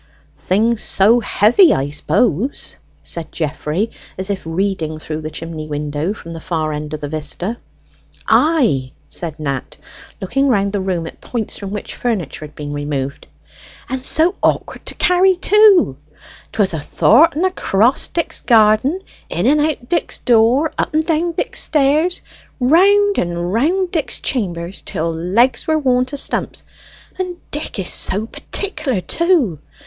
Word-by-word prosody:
"Things 220 Hz, +4 st, +1 dB
so 220 Hz, +5 st, +4 dB
heavy, 240 Hz, -, +4 dB
I 140 Hz, +2 st, -2 dB
suppose," 190 Hz, -, 0 dB, 0.3 s
said 165 Hz, -2 st, -6 dB
Geoffrey, 155 Hz, +6 st, -2 dB, 0.3 s
as 190 Hz, +2 st, -2 dB
if 195 Hz, -, -4 dB
reading 165 Hz, -2 st, -2 dB
through 155 Hz, 0 st, -5 dB
the 155 Hz, -, -5 dB
chimney 160 Hz, 0 st, -6 dB
window 150 Hz, +3 st, -3 dB
from 170 Hz, -5 st, -8 dB
the 165 Hz, -, -7 dB
far 160 Hz, -3 st, -2 dB
end 150 Hz, 0 st, -4 dB
of 150 Hz, -, -9 dB
the 145 Hz, -, -3 dB
vista. 155 Hz, +8 st, -4 dB, 0.7 s
"Ay," 230 Hz, -, +2 dB
said 165 Hz, -3 st, -6 dB
Nat, 140 Hz, -4 st, -4 dB, 0.4 s
looking 270 Hz, +9 st, 0 dB
round 200 Hz, -5 st, +1 dB
the 205 Hz, -, 0 dB
room 180 Hz, -3 st, -2 dB
at -, -, -10 dB
points 230 Hz, -4 st, -4 dB
from 200 Hz, -, -6 dB
which 205 Hz, +1 st, -6 dB
furniture 200 Hz, -, -3 dB
had 150 Hz, -, -14 dB
been 145 Hz, -1 st, -6 dB
removed. 145 Hz, -2 st, -4 dB, 0.6 s
"And 260 Hz, 0 st, -3 dB
so 320 Hz, +6 st, +3 dB
awkward -, -, -1 dB
to -, -, -5 dB
carry, 365 Hz, +1 st, +3 dB
too. 390 Hz, -, +4 dB, 0.5 s
'Twas 200 Hz, -4 st, 0 dB
ath'art 240 Hz, -, +3 dB
and 335 Hz, +5 st, +1 dB
across 245 Hz, -, +1 dB
Dick's 335 Hz, -, -2 dB
garden; 225 Hz, -, +3 dB, 0.3 s
in -, -, -2 dB
and 295 Hz, +2 st, +4 dB
out 295 Hz, -5 st, -1 dB
Dick's 345 Hz, -, -1 dB
door; 245 Hz, +6 st, +3 dB
up -, -, -1 dB
and 315 Hz, 0 st, +2 dB
down 335 Hz, +1 st, 0 dB
Dick's 415 Hz, -, -2 dB
stairs; 305 Hz, +4 st, +1 dB, 0.4 s
round 400 Hz, +10 st, +4 dB
and 175 Hz, +1 st, -2 dB
round 350 Hz, -, +1 dB
Dick's 320 Hz, -5 st, -3 dB
chammers 180 Hz, -7 st, -3 dB
till 165 Hz, +1 st, -3 dB
legs 215 Hz, +10 st, +1 dB
were 315 Hz, 0 st, +2 dB
worn 255 Hz, -4 st, +2 dB
to 285 Hz, +3 st, -6 dB
stumps: -, -, -1 dB, 0.6 s
and 365 Hz, -2 st, -3 dB
Dick 295 Hz, -4 st, -4 dB
is 190 Hz, -3 st, -2 dB
so 205 Hz, +3 st, +2 dB
particular, 300 Hz, -, -2 dB
too. 295 Hz, -, +1 dB
215 Hz, 150 wpm, -18 LUFS, -, 0.7 s, so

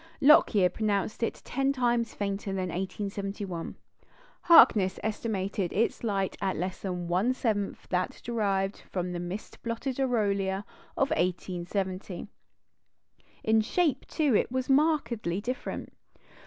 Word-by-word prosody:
Lockyer 220 Hz, -9 st, +6 dB
pronounced 210 Hz, 0 st, -1 dB
it 230 Hz, -, -2 dB
ten 270 Hz, +1 st, +1 dB
times 240 Hz, -3 st, 0 dB
fainter 200 Hz, 0 st, -3 dB
than 185 Hz, -2 st, -2 dB
in -, -, -5 dB
1871; 195 Hz, -2 st, -4 dB, 0.7 s
Harkness 205 Hz, -, +6 dB
estimated 200 Hz, -4 st, -2 dB
its 225 Hz, +4 st, 0 dB
light 195 Hz, -4 st, 0 dB
at 190 Hz, -1 st, 0 dB
less 185 Hz, +2 st, -3 dB
than 180 Hz, -3 st, -3 dB
one 195 Hz, +9 st, +1 dB
seventh 210 Hz, -6 st, -2 dB
that 180 Hz, 0 st, -1 dB
derived 200 Hz, -4 st, 0 dB
from 180 Hz, -1 st, -2 dB
the 175 Hz, -, -3 dB
mist 175 Hz, +4 st, -6 dB
blotted 240 Hz, +3 st, -3 dB
aureola 200 Hz, -6 st, 0 dB, 0.3 s
of 275 Hz, -, +1 dB
1870. 185 Hz, +1 st, -2 dB, 1.2 s
In 220 Hz, 0 st, +4 dB
shape, 290 Hz, +3 st, 0 dB
too, 295 Hz, -7 st, +1 dB
it -, -, +2 dB
was 255 Hz, 0 st, -1 dB
markedly 245 Hz, -, +2 dB
different. 245 Hz, +4 st, -5 dB
205 Hz, 125 wpm, -28 LUFS, 190-235 Hz, 1.2 s, Lockyer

